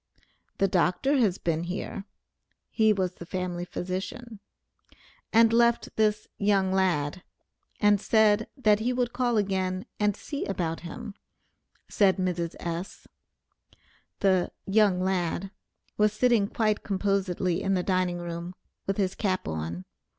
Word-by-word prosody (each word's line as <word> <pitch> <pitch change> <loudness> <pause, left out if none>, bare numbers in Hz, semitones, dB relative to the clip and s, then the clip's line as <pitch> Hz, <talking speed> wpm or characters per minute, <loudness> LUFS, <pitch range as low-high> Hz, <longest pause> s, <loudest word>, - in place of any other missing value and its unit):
"The 195 - +3
Dr. 190 +10 +2
has 205 -7 +2
been 165 0 -1
here" 190 +2 -5 0.7
(he 220 -1 +4
was 190 -3 0
the 170 - -10
family 180 -1 -3
physician), 190 +6 -5 0.9
"and 225 0 +5
left 235 0 +2
this 210 -1 +1
'young 200 -2 +2
lad,' 180 -3 +1 0.6
and 205 -1 +4
said, 220 -1 +3
that 215 -5 +3
he 245 +3 0
would 245 -1 -1
call 245 -2 +1
again 190 -2 -1
and 210 -1 +1
see 285 -1 -5
about 170 -4 -2
him," 210 +5 -8 0.7
said 200 -3 +3
Mrs. 175 -3 -2
S. 170 +2 -5 1.2
The 190 -3 +2
"young 200 -2 +3
lad" 190 0 -1 0.5
was 210 0 +3
sitting 230 -2 +3
quite 215 -1 0
composedly 190 -3 0
in 195 0 +1
the 180 - 0
dining 185 -2 0
room, 175 +1 -6 0.3
with 195 - -1
his 190 -2 0
cap 190 -3 -1
on. 80 +3 -4
195 Hz, 130 wpm, -27 LUFS, 180-215 Hz, 1.2 s, and